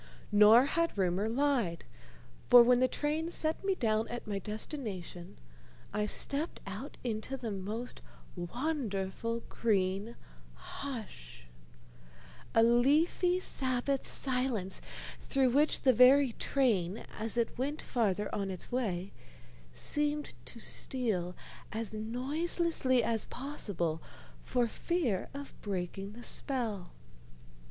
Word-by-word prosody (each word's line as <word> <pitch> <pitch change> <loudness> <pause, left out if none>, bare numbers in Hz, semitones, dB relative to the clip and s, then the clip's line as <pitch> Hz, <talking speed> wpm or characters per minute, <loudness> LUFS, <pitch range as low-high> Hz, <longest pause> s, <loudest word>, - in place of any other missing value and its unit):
Nor 210 +4 +8
had 335 -2 0
rumor 190 +3 +1
lied, 240 - 0 0.6
for 245 -1 +10
when 245 +1 +5
the 255 - +4
train 305 +5 -1
set 320 0 0
me 390 -1 +1
down 220 -6 +1
at 240 - -6
my 205 -2 -2
destination 210 - -5 0.6
I 210 0 0
stepped 285 +8 -1
out 205 +8 -7
into 240 +3 -3
the 235 -4 -4
most 210 +5 -5 0.3
wonderful 230 - -2
green 200 0 0 0.4
hush, 210 - -8 1.1
a 225 - +7
leafy 300 +10 +3
Sabbath 265 -4 -1
silence 250 -8 -1 0.4
through 265 -3 +2
which 290 +4 +3
the 260 - +5
very 255 +2 +7
train, 215 -10 0
as 225 +2 -1
it 235 -1 0
went 285 +4 -1
farther 210 -4 -1
on 200 -1 -1
its 185 +4 -3
way, 200 -7 -2 0.6
seemed 295 0 -1
to - - -11
steal 200 -9 -2 0.4
as 220 -1 -3
noiselessly 260 +4 +2
as 225 -1 +1
possible 195 - -2 0.4
for 245 -1 +1
fear 255 - -1
of 280 0 -7
breaking 195 0 -4
the 240 +2 -10
spell. 225 -12 -2
235 Hz, 115 wpm, -32 LUFS, 205-275 Hz, 1.1 s, for